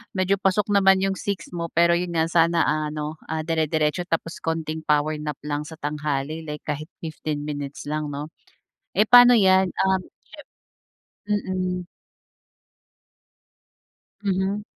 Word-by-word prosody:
Medyo 185 +1 +1
pasok 195 +2 +1
naman 195 -1 +5
yung 195 -1 -1
6 200 -4 -4
mo 170 -1 -3
pero 170 +1 +3
yun 175 -1 -4
nga 160 0 +1
sana 165 0 +3
ano, 150 0 -2
ah, 160 0 -2
dire-diretso 160 +1 0
tapos 165 0 -3
konting 160 -1 -3
power 150 +1 +2
nap 150 -1 -4
lang 150 0 -3
sa 160 - -9
tanghali 150 +1 -3
like 150 0 -6
kahit 150 +1 -4 0.2
15 155 -2 -4
minutes 145 -2 -5
lang, 150 +1 -3
'no? 145 +2 -6 0.7
Eh 210 - +5
paano 245 0 +8
yan, 190 -2 +4
um, 190 +1 +1 1.3
siyem 210 0 +1 0.4
mm. - - -21 2.4
Mhm. 195 +1 0
160 Hz, 135 wpm, -24 LUFS, 150-190 Hz, 2.4 s, paano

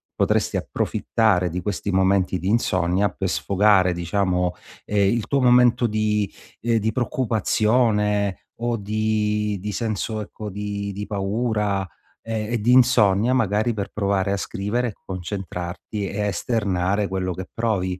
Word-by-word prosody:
Potresti - - +1
approfittare 95 -6 0
di 90 +2 -4
questi 100 +1 -3
momenti 95 -1 +2
di 90 - -4
insonnia 95 -3 +1
per 95 +1 -3
sfogare 100 -2 +3
diciamo, 90 +1 0 0.3
ehm, 100 -1 +2
il 115 -3 -2
tuo 140 -1 +1
momento 125 -1 +5
di 105 -1 0 0.3
ehm, 115 0 +1
di 110 +1 0
preoccupazione 110 -4 +1
o 120 0 0
di 105 0 0
di 105 +1 -3
senso, 110 0 -2
ecco, 105 0 -7
di 100 0 -4
di 100 +2 -5
paura 105 0 -1 0.4
e 110 -1 -3
e 115 - 0
di 120 +3 +3
insonnia, 120 -2 +4
magari 110 -1 +1
per 100 -2 -4
provare 100 -1 0
a - - 0
scrivere, 110 +4 -2
concentrarti 95 +1 -5
e 100 - -6
esternare 100 -1 0
quello 95 -1 -2
che 95 +1 -7
provi. 95 -5 -1
105 Hz, 135 wpm, -23 LUFS, 95-110 Hz, 0.4 s, momento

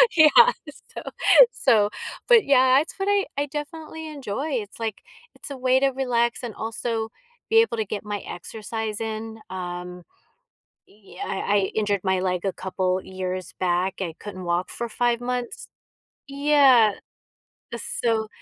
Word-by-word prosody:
Yeah, 315 -2 +8 0.7
so - - -5 0.5
so 215 -5 +3 0.4
but, 470 -3 +6
yeah, 260 -1 +5
it's 310 - -4
what 390 +1 -2
I 405 -1 +3
I 285 - +1
definitely 315 +2 -7
enjoy, 280 -1 -4
it's, 215 -3 -4
like, 225 -3 -4 0.3
it's - - -7
a 275 - -6
way 255 0 +3
to 275 0 +3
relax 245 -3 0
and 235 -3 -5
also 225 0 -3 0.4
be 450 0 +6
able 455 - -1
to 220 - -1
get 205 +2 -5
my 205 -1 -3
exercise 220 +3 -5
in, 220 0 -5
um 180 -1 -6 0.8
yeah, 205 -1 -11
I 195 +1 -2
I - - +6 0.2
injured 205 -3 0
my 190 -1 +1
leg 180 0 -1
a 190 - 0
couple 185 0 -1
years 185 -1 -5
back, 180 +1 0
I 170 -3 -3
couldn't 195 -3 -8
walk 175 +1 -1
for 235 - -4
5 240 +1 +1
months. 245 0 -4 0.6
Yeah, 275 -6 +5 0.8
so 225 -2 -1
225 Hz, 150 wpm, -24 LUFS, 190-265 Hz, 0.8 s, Yeah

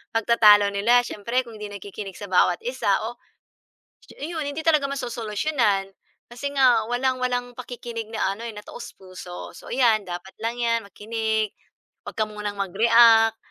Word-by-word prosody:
pagtatalo 210 -3 +5
nila 235 +5 +3
siyempre 235 +3 -2
kung 230 -2 -12
'di 210 - -5
nakikinig 200 -1 -8
sa 205 - -8
bawat 180 -1 +3
isa 245 -4 -1 0.2
o, 240 - -18 0.8
shu - - -16
iyon 320 +1 -3
hindi 285 +2 -4
talaga 305 -4 +4
masosolusyunan. 230 -4 -1 0.4
Kasi 245 +4 -4
nga 245 -5 +4
walang 255 +1 0
walang 245 -1 0
pakikinig 240 -2 -7
na 215 -3 -1
ano 220 - -11
eh, 230 - -7
na 210 - -9
taos-puso. 185 -1 -10
So - - -13
ayan 235 -4 +3
dapat 180 +2 -7
lang 230 +2 -2
'yan 230 -2 0
makinig, 220 0 -2 0.5
'wag - - -9
ka 215 - +3
munang 210 -1 -6
mag-react, 225 +3 +5
225 Hz, 155 wpm, -24 LUFS, 205-245 Hz, 0.8 s, pagtatalo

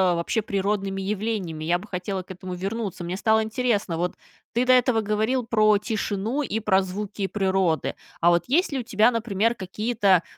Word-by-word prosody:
вообще 170 +7 0
природными 195 -1 -1
явлениями, 195 -5 -2
я 170 +2 +2
бы 195 +4 -11
хотела 185 0 -3
к 190 - -12
этому 185 0 -6
вернуться. 195 0 -4
Мне 175 +2 -3
стало 220 +1 +3
интересно, 220 -6 0
вот 180 +2 -1 0.4
ты 245 +2 +2
до 255 - +6
этого 250 -2 +4
говорил 220 +4 0
про 215 -2 +4
тишину 215 +4 -2
и 225 -6 -2
про 195 -3 +3
звуки 195 +1 -4
природы. 190 -5 0 0.3
А 170 +1 +5
вот 170 - +2
есть 315 +7 +2
ли 275 - -1
у - - -3
тебя, 220 +1 +3
например, 230 -1 +1
какие-то 200 -2 +1
205 Hz, 180 wpm, -25 LUFS, 190-225 Hz, 0.4 s, до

